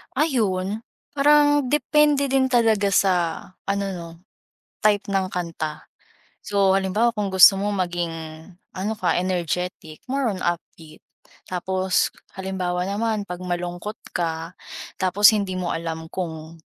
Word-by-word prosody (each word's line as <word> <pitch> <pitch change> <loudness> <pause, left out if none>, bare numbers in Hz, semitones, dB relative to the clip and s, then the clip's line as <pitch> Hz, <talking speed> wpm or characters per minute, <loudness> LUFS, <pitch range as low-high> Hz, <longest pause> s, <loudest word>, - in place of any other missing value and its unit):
Ayun, 220 - 0 0.3
parang 290 -1 +4
depende 295 -1 +3
din 260 -1 +2
talaga 220 -5 +3
sa 195 0 +4 0.5
ano 200 0 -1
‘no, 170 -1 -7 0.8
type 210 -1 +3
ng 195 -2 -1
kanta. 165 -4 -4 0.6
So 200 -2 +2
halimbawa, 195 +5 +1
kung 210 -3 -2
gusto 190 +1 +8
mo 205 - 0
maging 175 -4 -1 0.6
ano 210 +4 -3
ka, 185 - +1
energetic 180 -3 -3
more 275 +1 0
on 185 - -7
upbeat. 165 -2 -4 0.5
Tapos 185 +1 0 0.2
halimbawa 185 -1 -2
naman 215 +1 -1
‘pag 180 - -4
malungkot 175 +2 -5 0.2
ka 165 +1 -3 0.4
tapos 190 +2 +5
hindi 200 -3 0
mo 180 -1 -2
alam 160 0 -4
kung 160 -3 -6
190 Hz, 120 wpm, -23 LUFS, 175-215 Hz, 0.8 s, gusto